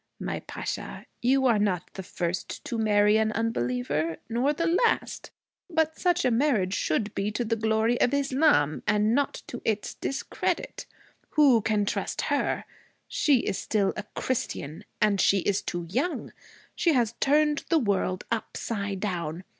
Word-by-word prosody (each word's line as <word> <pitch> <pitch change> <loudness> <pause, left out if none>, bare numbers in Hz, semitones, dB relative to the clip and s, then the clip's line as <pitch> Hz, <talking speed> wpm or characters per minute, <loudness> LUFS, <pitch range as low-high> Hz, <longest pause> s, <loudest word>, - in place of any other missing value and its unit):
'My - - -3
Pasha, - - -6 0.2
you 265 +2 +3
are 235 -4 +4
not 185 -4 -1
the 190 - -6
first 175 -1 -4
to 235 - -3
marry 210 -1 +4
an 220 0 +2
unbeliever, 150 - -1
nor 245 +5 +1
the 335 +3 -1
last. 365 +8 +1 0.4
But 320 -2 0
such 355 -4 +2
a 250 - +3
marriage 225 -7 +2
should 205 +2 -1
be 200 +1 -1
to 235 +3 -2
the 230 +1 0
glory 220 +2 +1
of - - +4
Islam, 275 - +2
and 210 +1 +3
not 280 +1 0
to 245 - -7
its 215 -2 -1
discredit. 275 - -3 0.5
Who 270 -7 +6
can 210 -1 +1
trust - - -2
her? - - 0 0.4
She 280 -7 +3
is 195 - -2
still 200 -3 0
a - - -3
Christian. 160 - -3
And 205 -2 +3
she 195 -1 +4
is 200 +1 0
too 175 -1 -4
young. 265 - -2 0.4
She 335 - +2
has 235 -4 +2
turned 295 +1 +2
the 335 - +4
world 200 -7 0
upside 205 -3 -3
down. 175 -4 -3
220 Hz, 155 wpm, -27 LUFS, 195-265 Hz, 0.5 s, Who